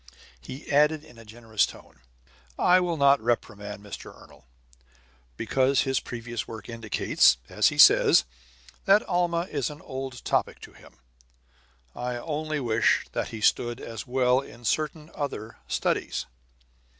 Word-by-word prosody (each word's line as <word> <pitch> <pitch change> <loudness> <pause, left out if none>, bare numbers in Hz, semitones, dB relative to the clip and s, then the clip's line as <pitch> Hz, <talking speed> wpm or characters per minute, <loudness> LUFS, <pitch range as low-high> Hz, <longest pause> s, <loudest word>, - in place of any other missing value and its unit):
He 130 - -10
added 150 +1 +3
in 120 -7 -16
a 115 - -13
generous 110 -1 -1
tone: - - -15 0.6
"I 180 +1 +5
will 175 -2 -1
not 140 -2 +4
reprimand 105 -3 -3
Mr. 105 - -9
Ernol, - - -18 0.9
because 130 +4 +2
his 135 -1 0
previous 120 -2 -6
work 110 -2 -9
indicates, 115 - +2
as - - +3
he - - -1
says, - - +7 0.6
that 200 +2 +5
Alma 175 -2 0
is 140 -5 -1
an 150 0 -10
old 130 -2 -7
topic - - 0
to - - -12
him. - - -18 1.0
I 125 0 -3
only 155 +3 -3
wish 115 -4 +2
that - - -2
he 110 - -8
stood 120 +2 +1
as 115 -2 -7
well 125 0 +2
in 120 -3 -13
certain 155 +4 -2
other 115 -6 -5
studies!" - - -1
125 Hz, 140 wpm, -26 LUFS, 115-150 Hz, 1.0 s, says